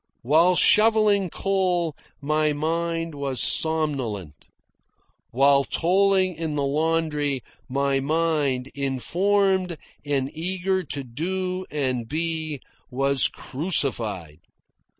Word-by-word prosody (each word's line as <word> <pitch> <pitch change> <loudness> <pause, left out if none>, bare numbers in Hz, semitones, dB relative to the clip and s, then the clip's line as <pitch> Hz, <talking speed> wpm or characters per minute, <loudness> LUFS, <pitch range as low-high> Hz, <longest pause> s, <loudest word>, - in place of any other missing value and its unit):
While 165 +8 +4
shovelling 210 -2 +4
coal 180 -4 0 0.2
my 155 +1 +1
mind 165 +2 -2
was 140 -3 -3
somnolent. 125 - -1 0.8
While 140 +2 +4
toiling 190 +3 +2
in 160 -2 -4
the 140 -1 0
laundry 150 -2 -1 0.3
my 140 +1 0
mind, 145 -3 0
informed 180 +7 0 0.3
and 140 -1 -2
eager 185 +3 -1
to 140 -2 -4
do 185 +8 -3
and 130 -5 -2
be, 160 -1 -2 0.3
was 135 +1 +2
crucified. 115 - -2
155 Hz, 90 wpm, -24 LUFS, 135-180 Hz, 0.8 s, While